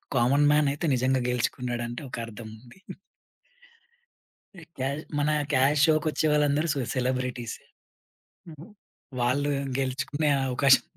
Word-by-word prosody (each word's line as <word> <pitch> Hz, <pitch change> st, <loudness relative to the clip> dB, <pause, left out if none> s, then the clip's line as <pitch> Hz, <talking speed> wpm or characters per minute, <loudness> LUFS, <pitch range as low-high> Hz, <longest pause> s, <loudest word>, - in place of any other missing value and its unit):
Common 135 Hz, +5 st, +3 dB
man 150 Hz, -1 st, +3 dB
అయితే 150 Hz, -, -4 dB
నిజంగా 130 Hz, +1 st, +1 dB
గెలుచుకున్నాడు 125 Hz, 0 st, -2 dB
అంటే 120 Hz, +3 st, -6 dB
ఒక -, -, -6 dB
అర్థముంది. 115 Hz, -, -12 dB, 1.8 s
ఎ 165 Hz, -, -12 dB, 0.2 s
ఎల్ 145 Hz, +3 st, -4 dB, 0.2 s
మన 150 Hz, +1 st, +1 dB, 0.2 s
'క్యాష్' 140 Hz, +3 st, +4 dB
షో‌కొచ్చే 155 Hz, 0 st, +1 dB
వాళ్ళందరూ 150 Hz, +2 st, +2 dB
సొ 140 Hz, -, -2 dB, 0.2 s
సెలబ్రిటీసే. 125 Hz, -2 st, -2 dB, 0.9 s
హుహు. 155 Hz, +4 st, -12 dB, 0.5 s
వాళ్ళు 140 Hz, +4 st, +1 dB, 0.3 s
గెలుచుకునే 135 Hz, +3 st, -1 dB, 0.2 s
అవకాశం 130 Hz, +1 st, +4 dB
135 Hz, 110 wpm, -26 LUFS, 125-150 Hz, 1.8 s, క్యాష్